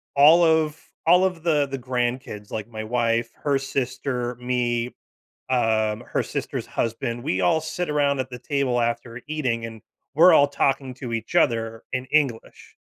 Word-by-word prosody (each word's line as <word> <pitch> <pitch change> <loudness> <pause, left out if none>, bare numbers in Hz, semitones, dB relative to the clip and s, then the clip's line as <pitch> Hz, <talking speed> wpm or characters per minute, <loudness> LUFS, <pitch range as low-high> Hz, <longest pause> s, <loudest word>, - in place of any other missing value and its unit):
all 155 +5 +7
of 160 -1 +2 0.3
all 180 +3 +6
of 180 -3 -2
the 150 -4 +2
the 135 - -4
grandkids, 120 -4 -3
like, 110 0 -4
my 110 -2 -6
wife, 115 0 0
her 140 -2 +2
sister, 130 -2 -3
me, 125 -1 -1 0.6
um, 110 -3 +1
her - - -1
sister's - - -4
husband, 115 +1 -3
we 95 - -1
all 95 - +3
sit 165 +1 -3
around 145 -2 +1
at 130 0 -4
the 125 - -7
table 135 -3 0
after 115 +1 -2
eating, 125 -7 -1
and 110 -2 -10 0.3
we're 170 +4 +7
all 145 -2 +6
talking 135 -2 0
to 125 -2 -7
each 115 -1 -4
other 115 -1 +1
in 130 0 -2
English, 140 -7 -1
125 Hz, 165 wpm, -24 LUFS, 115-145 Hz, 0.6 s, all